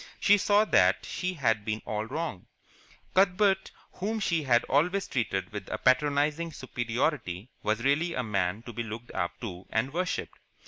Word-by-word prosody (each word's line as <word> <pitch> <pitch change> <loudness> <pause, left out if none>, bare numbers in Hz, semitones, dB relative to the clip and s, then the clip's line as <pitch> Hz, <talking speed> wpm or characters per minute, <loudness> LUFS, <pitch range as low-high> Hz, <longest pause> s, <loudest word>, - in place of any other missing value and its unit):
She 205 0 +5
saw 205 +2 +4
that 95 - +3
she 185 0 -3
had 115 -8 +1
been 110 +1 -3
all 110 0 -2
wrong. 150 - -4 0.7
Cuthbert, 190 +1 +3 0.2
whom 215 +4 -3
she 170 -5 +1
had 120 -4 +3
always 180 +8 +1
treated 95 -7 -2
with 105 -3 -6
a - - -2
patronizing 145 +5 +2
superiority, 120 - -2
was 110 +2 0
really 155 +6 +2
a 125 - -1
man 100 -1 -1
to 120 - -9
be 120 - -3
looked 115 +1 -7
up 90 -2 -3
to 95 -6 -7
and 125 +5 -1
worshipped. 180 +2 -2
130 Hz, 165 wpm, -29 LUFS, 110-170 Hz, 0.7 s, She